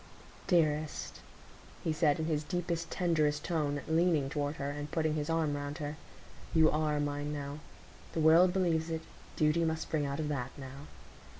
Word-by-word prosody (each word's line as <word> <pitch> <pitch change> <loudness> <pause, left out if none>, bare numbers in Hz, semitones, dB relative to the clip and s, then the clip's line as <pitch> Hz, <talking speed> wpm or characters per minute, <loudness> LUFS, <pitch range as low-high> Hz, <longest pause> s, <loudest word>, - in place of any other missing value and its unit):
"Dearest," 155 -3 +1 0.6
he 160 - +1
said, 155 -2 +3
in 160 - -1
his 155 -2 0
deepest, 170 +1 -2
tenderest 155 -5 +1
tone, 145 -4 -1
leaning 160 -4 +2
toward 145 0 -1
her, 140 -1 -3
and 145 +1 -5
putting 155 -1 0
his 150 0 -2
arm 160 -3 +1
round 145 +1 -4
her, 150 -2 -4 0.6
"you 160 -1 +6
are 150 -1 +1
mine 145 0 -2
now,—the 145 +2 -8
world 165 +3 +6
believes 170 -3 +1
it; 160 -1 -2 0.3
duty 155 +2 +3
must 160 0 0
spring 150 -3 -1
out 140 +1 -3
of 155 - -1
that 135 -4 -2
now. 135 +1 -9
155 Hz, 165 wpm, -32 LUFS, 145-165 Hz, 0.6 s, you